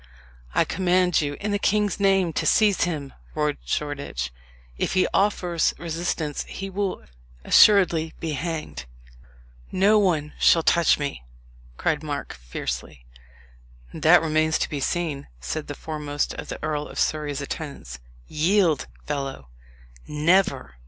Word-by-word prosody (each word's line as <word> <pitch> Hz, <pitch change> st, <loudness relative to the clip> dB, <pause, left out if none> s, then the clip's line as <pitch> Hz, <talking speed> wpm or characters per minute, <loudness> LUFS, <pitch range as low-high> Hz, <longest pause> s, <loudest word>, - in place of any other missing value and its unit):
"I -, -, +4 dB
command 180 Hz, -2 st, +2 dB
you, 145 Hz, -1 st, -2 dB
in 205 Hz, +1 st, -2 dB
the 205 Hz, -, 0 dB
king's 210 Hz, 0 st, +1 dB
name, 195 Hz, -4 st, +3 dB
to -, -, -1 dB
seize 210 Hz, -4 st, +4 dB
him!" 150 Hz, -6 st, -4 dB, 0.2 s
roared 150 Hz, -1 st, 0 dB
Shoreditch. 140 Hz, -, -3 dB, 0.4 s
"If -, -, -2 dB
he 185 Hz, -, +4 dB
offers 180 Hz, -4 st, +1 dB
resistance 165 Hz, -2 st, -3 dB
he 195 Hz, 0 st, -6 dB
will 195 Hz, 0 st, -2 dB, 0.4 s
assuredly 175 Hz, -6 st, +5 dB
be 165 Hz, -, -3 dB
hanged." 155 Hz, -, -4 dB, 0.9 s
"No 205 Hz, +3 st, +4 dB
one 160 Hz, -7 st, +1 dB
shall 165 Hz, -, +5 dB
touch 170 Hz, 0 st, +4 dB
me!" 140 Hz, -, -4 dB, 0.5 s
cried 155 Hz, -2 st, 0 dB
Mark 145 Hz, -2 st, -4 dB
fiercely. -, -, -6 dB, 0.9 s
"That 165 Hz, +1 st, +5 dB
remains 155 Hz, 0 st, +2 dB
to -, -, -1 dB
be 145 Hz, -, -2 dB
seen," 155 Hz, -1 st, -2 dB
said 105 Hz, -, -4 dB
the 145 Hz, -, -5 dB
foremost 150 Hz, -2 st, -3 dB
of -, -, -7 dB
the -, -, -4 dB
Earl 150 Hz, -1 st, -2 dB
of -, -, -11 dB
Surrey's 150 Hz, -2 st, -1 dB
attendants. 140 Hz, -, -6 dB, 0.3 s
"Yield, 165 Hz, -, +2 dB, 0.2 s
fellow!" 135 Hz, -, -4 dB, 0.6 s
"Never!" 155 Hz, -, +1 dB
155 Hz, 130 wpm, -24 LUFS, 145-180 Hz, 0.9 s, assuredly